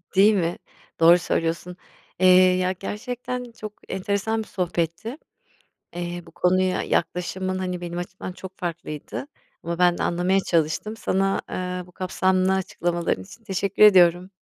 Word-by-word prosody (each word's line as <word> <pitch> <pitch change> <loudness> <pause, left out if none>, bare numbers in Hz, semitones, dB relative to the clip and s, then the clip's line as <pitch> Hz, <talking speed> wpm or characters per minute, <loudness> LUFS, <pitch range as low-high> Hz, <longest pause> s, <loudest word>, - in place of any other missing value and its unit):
Değil 205 +3 +6
mi? 170 -2 0 0.4
Doğru 170 +2 +8
söylüyorsun. 170 +1 -2 0.4
Eee, 185 - +5 0.3
ya, 185 0 +1
gerçekten 245 +5 -5
çok 215 -2 -8 0.2
enteresan 200 +3 -1
bir - - -16
sohbetti. 180 - -2 0.8
Eee, 175 0 -4
bu 165 - -13
konuya 185 +2 +1
yaklaşımın, 185 +2 -1
hani, 180 -1 -3
benim 175 0 -5
açımdan 185 +1 -6
çok 190 +1 -10
farklıydı 170 - -5 0.4
ama 170 0 -4
ben 175 -1 +4
de - - -1
anlamaya 180 +3 +2
çalıştım. 170 +6 0
Sana, 195 -2 0
eee, 180 -1 -4
bu 180 - -18
kapsamlı 185 +1 +1
açıklamaların 175 -2 -1
için 225 +4 -15
teşekkür 200 0 -1
ediyorum. 180 -2 +6
185 Hz, 135 wpm, -24 LUFS, 175-195 Hz, 0.8 s, Doğru